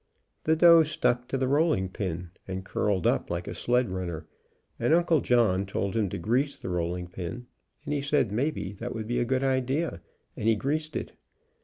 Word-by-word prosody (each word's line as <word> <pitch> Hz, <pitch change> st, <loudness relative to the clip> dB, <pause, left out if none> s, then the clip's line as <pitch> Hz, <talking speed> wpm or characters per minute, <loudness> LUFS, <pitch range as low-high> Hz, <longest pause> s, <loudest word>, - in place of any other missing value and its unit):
The 160 Hz, -, +4 dB
dough 170 Hz, 0 st, +8 dB
stuck 125 Hz, -5 st, 0 dB
to 135 Hz, -, -1 dB
the 130 Hz, 0 st, 0 dB
rolling 145 Hz, -, +2 dB
pin, 90 Hz, -3 st, -4 dB, 0.2 s
and 95 Hz, 0 st, -5 dB
curled 95 Hz, -2 st, 0 dB
up -, -, +1 dB
like -, -, -3 dB
a -, -, -4 dB
sled 125 Hz, -4 st, +1 dB
runner, 85 Hz, -4 st, -4 dB, 0.5 s
and 160 Hz, -, +4 dB
Uncle 170 Hz, -3 st, +3 dB
John 110 Hz, -6 st, +3 dB
told 100 Hz, +1 st, -2 dB
him 105 Hz, -4 st, +1 dB
to -, -, -4 dB
grease 125 Hz, -, 0 dB
the -, -, -6 dB
rolling 90 Hz, 0 st, -2 dB
pin, 90 Hz, +7 st, -6 dB, 0.4 s
and 150 Hz, -, -2 dB
he 145 Hz, -, 0 dB
said 140 Hz, -6 st, +1 dB
maybe 125 Hz, -3 st, -1 dB
that 115 Hz, +5 st, -6 dB
would 110 Hz, -1 st, -4 dB
be 120 Hz, +2 st, -1 dB
a 120 Hz, -, +1 dB
good 130 Hz, +2 st, 0 dB
idea, 135 Hz, -, 0 dB, 0.3 s
and 110 Hz, -, -3 dB
he 115 Hz, -, +5 dB
greased 155 Hz, +7 st, -2 dB
it. -, -, -4 dB
120 Hz, 195 wpm, -28 LUFS, 95-140 Hz, 0.5 s, dough